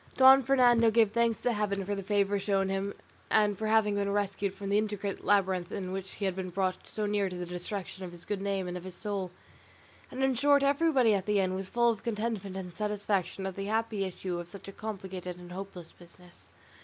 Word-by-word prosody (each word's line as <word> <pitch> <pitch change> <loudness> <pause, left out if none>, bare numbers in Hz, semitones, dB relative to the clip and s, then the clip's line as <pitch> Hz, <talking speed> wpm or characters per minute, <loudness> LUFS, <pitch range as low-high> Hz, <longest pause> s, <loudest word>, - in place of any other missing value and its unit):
Don 265 +1 +9
Fernando 245 -3 +5
gave 220 -2 +4
thanks 235 0 +2
to 245 - 0
Heaven 200 -2 -1
for 205 - -2
the 200 - -3
favour 200 0 +1
shown 195 -1 +1
to - - 0
him 195 +1 -2 0.4
and 210 -1 +3
for 220 +3 -3
having 215 -1 +3
been 200 0 0
rescued 200 -1 -1
from 200 -1 -6
the 205 +1 +4
intricate 205 -2 -3
labyrinth 190 -3 +2
in 185 -2 -4
which 190 0 -5
he 205 - -4
had 190 -2 0
been 190 -1 -4
brought 185 0 -2
so 215 - -3
near 205 -2 +1
the 180 -1 -5
destruction 185 +2 -5
of 180 - -6
his 175 0 -13
good 205 -2 -3
name 195 -2 -1
and 180 - -4
of 180 - -6
his 185 -1 -8
soul; 200 -2 -3 0.8
and 260 +1 -3
in 265 0 +3
short 285 +3 +4
everybody 280 -5 +4
in 195 - +2
the 210 -1 +3
inn 185 -1 +1
was 190 0 -4
full 235 0 +3
of 220 - -5
contentment 210 -4 -3
and 180 -3 -7
satisfaction 205 -2 -1
at 190 -1 -4
the 195 - -4
happy 220 -1 0
issue 185 -1 -4
of 175 - -6
such 195 +2 -11
a - - -6
complicated 190 -4 -6
and 180 0 -11
hopeless 180 -2 -8
business. 175 0 -18
200 Hz, 225 wpm, -30 LUFS, 185-215 Hz, 0.8 s, Don